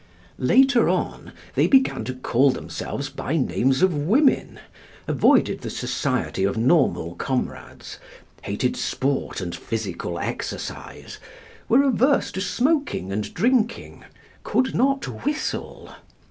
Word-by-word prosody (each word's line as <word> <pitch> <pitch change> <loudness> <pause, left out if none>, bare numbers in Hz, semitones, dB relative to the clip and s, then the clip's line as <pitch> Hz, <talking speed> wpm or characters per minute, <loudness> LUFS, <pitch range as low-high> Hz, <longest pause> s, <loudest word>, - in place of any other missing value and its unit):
Later 265 -2 +4
on, - - -2 0.2
they - - +3
began 265 - +3
to 130 +2 -4
call 130 +2 +2
themselves 140 +2 -4
by 145 +2 -3
names 135 +1 +1
of 185 -2 +4
women, 215 - +2 0.5
avoided - - +3
the - - -5
society - - -2
of 100 +3 0
normal 120 - +2
comrades, 130 +7 -5 0.4
hated - - -2
sport 135 -5 -2
and 85 -2 -4
physical 95 -6 -4
exercise, - - -6 0.5
were 255 +5 +5
averse 270 +1 +2
to 190 - -4
smoking 270 - 0
and 105 +1 -3
drinking, 235 -2 0 0.4
could 265 - 0
not 275 +2 0
whistle. 295 +1 -4
165 Hz, 115 wpm, -23 LUFS, -, 0.5 s, were